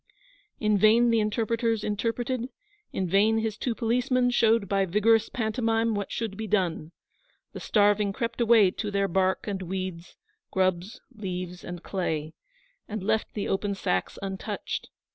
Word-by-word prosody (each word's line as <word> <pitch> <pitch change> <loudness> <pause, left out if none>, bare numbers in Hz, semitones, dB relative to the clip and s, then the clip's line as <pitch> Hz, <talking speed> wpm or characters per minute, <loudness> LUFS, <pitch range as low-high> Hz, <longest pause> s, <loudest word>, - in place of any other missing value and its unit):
In 210 -2 +2
vain 230 +3 +5
the 230 - +3
interpreters 225 +1 0
interpreted; 235 +4 -2 0.4
in 190 - -2
vain 205 +5 +3
his 220 -1 -1
two 235 +1 -2
policemen 245 +2 +1
showed 225 -3 +3
by 195 +1 +2
vigorous 210 +4 +3
pantomime 225 0 0
what 205 -1 -3
should 220 -4 -3
be 220 +2 -5
done. 175 -6 0 0.6
The - - -6
starving 205 -1 +3
crept 230 +3 -3
away 225 -5 +5
to 205 - -4
their 200 -1 +1
bark 190 +1 +1
and 195 -2 -3
weeds, 185 -1 -5 0.3
grubs, 185 +5 0
leaves, 180 -5 -6
and 175 -1 -7
clay, 160 -5 -2 0.5
and 215 -2 -5
left 220 +2 0
the 205 - -2
open 200 +1 -1
sacks 95 - -1
untouched. 190 -1 -4
210 Hz, 145 wpm, -27 LUFS, 190-225 Hz, 0.6 s, vain